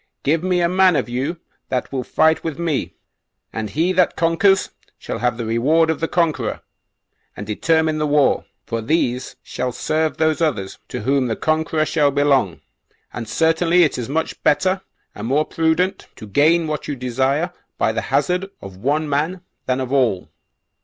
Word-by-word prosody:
Give 155 +3 +2
me 180 -1 +1
a 170 - +3
man 185 0 +4
of 130 -4 -1
you 135 +8 -2 0.3
that 130 -1 -2
will 130 -2 -2
fight 160 +4 +2
with 160 -4 -4
me, 165 -4 -2 0.6
and 110 -1 -3
he 165 - +1
that 180 -1 +2
conquers 170 +4 +2 0.3
shall - - -5
have 120 0 0
the 120 - -4
reward 150 +9 +2
of 160 - -3
the 165 - -1
conqueror 155 -11 0 0.8
and 105 - -6
determine 155 +8 +1
the 150 - 0
war; 145 -1 +2 0.2
for 115 0 -3
these 125 -1 -1
shall 125 0 -3
serve 155 +5 -1
those 160 0 +1
others 100 -12 -1
to - - -5
whom 135 +3 +1
the 115 - -1
conqueror 155 0 0
shall 150 -3 +2
belong; 140 - +1 0.5
and 115 -2 -6
certainly 165 +6 +3
it 155 - +1
is 120 - -5
much 160 +3 -2
better, 185 +5 +2 0.3
and 105 +2 -6
more 145 +4 +2
prudent, 165 +4 0
to 110 - -10
gain 155 - +3
what 155 -1 -4
you 145 - -2
desire 135 +7 -1 0.2
by - - +2
the - - -2
hazard 180 +2 +1
of 95 -1 -10
one 145 +9 0
man 155 +6 -1 0.3
than 130 0 +1
of 130 0 -3
all." 120 -9 +1
150 Hz, 175 wpm, -20 LUFS, 125-165 Hz, 0.8 s, man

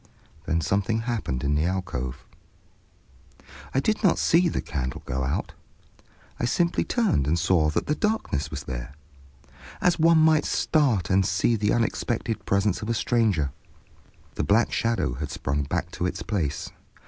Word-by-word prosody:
Then 80 0 +1
something 100 +6 0
happened 110 - -3
in 70 +1 +1
the 75 +2 +1
alcove. 85 -9 -3 1.5
I 135 - +1
did 215 +9 0
not 190 - +4
see 170 +2 +3
the - - -2
candle 65 -5 -4
go 65 +1 -2
out, 65 - -2 0.9
I - - 0
simply 170 +8 +1
turned 215 - +1
and 80 +3 +2
saw 85 -2 +2
that 75 - -1
the 150 - +1
darkness 150 - -1
was 75 -3 -6
there, 65 +2 -6 0.8
as 180 -2 +2
one 165 +1 +5
might 155 -1 +4
start 125 - +1
and 95 +1 +4
see 95 +5 +1
the 105 -1 +1
unexpected 115 0 -1
presence 100 -1 +1
of 105 - -5
a 115 - +1
stranger. 105 - +1 0.8
The - - -2
black 110 +4 +3
shadow 115 - 0
had - - -5
sprung 70 +2 -2
back - - -2
to 90 - -2
its - - -4
place. 80 -9 -2
100 Hz, 160 wpm, -25 LUFS, 75-120 Hz, 1.5 s, one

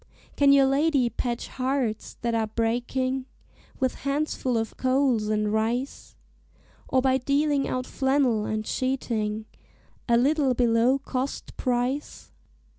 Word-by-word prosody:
"Can 280 -1 +5
your 275 -1 +6
lady 275 -2 +2
patch 240 +1 -3
hearts 255 -4 -2
that 235 -1 -1
are 225 -1 +1
breaking, 245 +4 -1 0.5
With 260 -2 +1
handfuls 275 -3 -1
of 225 0 -3
coals 255 -4 +1
and 210 0 0
rice, 235 +5 -2 0.7
Or 260 -1 +2
by 265 -1 +3
dealing 280 +2 +1
out 255 0 -2
flannel 265 -6 +1
and 215 0 -2
sheeting 220 -5 -2 0.6
A 235 - +5
little 275 0 +2
below 240 +2 +3
cost 270 -1 -4
price? 250 +3 -2
255 Hz, 120 wpm, -26 LUFS, 230-270 Hz, 0.7 s, your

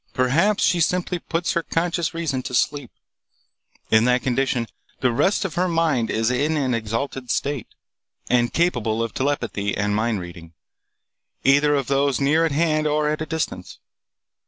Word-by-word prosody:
Perhaps 165 +12 +2
she 175 - +3
simply 180 +2 0
puts 170 +1 -2
her 170 - 0
conscious 170 0 -1
reason 160 -6 -2
to 125 - -5
sleep. 145 -1 0 1.0
In 110 +1 +5
that 125 0 +2
condition 130 -1 0 0.4
the 130 - +3
rest 190 - +1
of 180 - -3
her 180 +1 +1
mind 160 -9 +1
is 110 +2 0
in 145 +5 0
an 130 -4 0
exalted 115 +3 -3
state, 140 -3 -1 0.6
and 120 -1 +2
capable 115 -10 0
of 115 - -4
telepathy 115 -7 -2
and 105 0 0
mind 110 -1 0
reading, 85 -2 -10 0.9
either 145 +2 +4
of 140 -2 0
those 140 -1 +1
near 150 +4 +3
at - - -5
hand 155 0 +1
or 150 0 +1
at 155 0 -2
a 155 - -3
distance. 155 - -4
140 Hz, 160 wpm, -22 LUFS, 120-160 Hz, 1.0 s, In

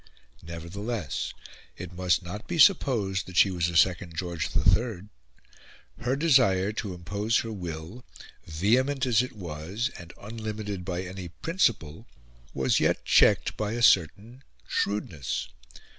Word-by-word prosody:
Nevertheless 85 - -4 0.5
it 90 0 -8
must 90 0 +1
not 95 +5 -7
be 175 - -3
supposed 120 - +3
that 90 -1 -7
she 95 - +6
was 85 -1 0
a 85 - 0
second 90 -2 +2
George 85 -2 -3
III. 105 -5 +1 0.9
Her 125 +2 0
desire 125 - +3
to 105 -4 -5
impose 100 +6 -1
her 115 - -6
will, 90 +3 -7 0.4
vehement 125 - +1
as 120 -3 +3
it 125 - -5
was, 95 - -4
and 85 -1 -10
unlimited 105 -3 -5
by 90 0 -3
any 95 0 -7
principle, 85 - -1 0.4
was 65 -1 +1
yet - - +1
checked - - +4
by 105 0 -2
a 120 0 -2
certain 105 - +3 0.3
shrewdness. 85 -14 -2
95 Hz, 130 wpm, -27 LUFS, 85-115 Hz, 0.9 s, she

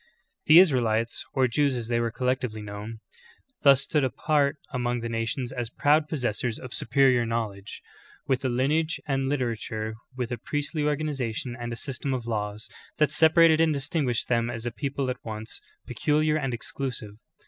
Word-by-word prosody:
5. 465 - -33 0.4
The 155 - +9
Israelites, 120 -10 +3
or 130 -2 +4
Jews 140 +3 +1
as 120 -2 -4
they 120 0 +1
were 115 0 0
collectively 125 -2 -2
known, 105 +2 -7 0.6
thus 140 -2 +6
stood 150 -3 +1
apart 140 +3 +1 0.2
among 120 -1 -1
the 115 - -4
nations 115 +2 -2
as 120 -3 -4
proud 150 +4 +2
pos 155 -5 -3
sessors 115 0 -1
of 130 -2 -8
superior 130 -3 +3
knowledge, 110 -4 -4 0.4
with 130 -1 0
a 130 - +1
lineage 150 +6 +1
and 135 -1 0
a - - 0
liter 130 -5 0
ature, 110 0 -4 0.2
with 125 -1 -3
a 120 - -3
priestly 145 +4 -2
organization 135 -5 -2
and 120 -1 -5
a - - -3
system 135 +1 -3
of 120 -2 -5
laws, 105 -2 -3 0.3
that 150 -2 +3
separated 160 0 +5
and 160 -2 +3
distinguished 135 -3 -1
them 120 -1 +1
as 115 -1 -5
a 120 - -1
people 140 +1 -3
at 125 - -8
once 110 0 -6 0.2
peculiar 150 +5 +1
and 135 -4 -1
exclusive. 120 -3 -5
125 Hz, 180 wpm, -26 LUFS, 115-145 Hz, 0.6 s, The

